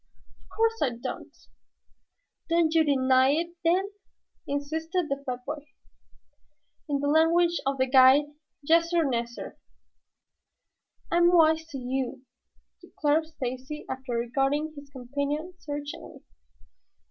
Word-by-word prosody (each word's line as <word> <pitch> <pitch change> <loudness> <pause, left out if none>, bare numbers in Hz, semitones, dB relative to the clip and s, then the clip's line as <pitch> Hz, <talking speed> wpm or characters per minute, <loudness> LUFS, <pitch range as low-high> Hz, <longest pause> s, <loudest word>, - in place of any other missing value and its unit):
"Of - - -16
course 455 0 +1
I 275 - +3
don't." 255 +2 -7 1.1
"Do 335 0 +3
you 325 0 +4
deny 260 -2 +3
it, 335 +3 -1
then?" 370 +4 +2 0.6
insisted 320 +4 -2
the 275 0 -2
fat 250 0 -4
boy. 295 0 -5 1.3
"In 280 -1 0
the 285 - -1
language 335 +3 +3
of 275 0 0
the 260 - +2
guide, 260 +2 +6 0.4
'yassir, 335 +2 +3
nassir.'" 235 -2 -4 1.5
"I'm 345 0 +4
wise 320 -2 +4
to 290 - -7
you," 255 0 -3 0.6
declared 310 +1 0
Stacy, 260 -1 -6
after 260 -1 -5
regarding 270 +6 0
his 285 -1 -11
companion 285 +6 -4
searchingly. 290 -1 -7
290 Hz, 110 wpm, -27 LUFS, 260-325 Hz, 1.5 s, guide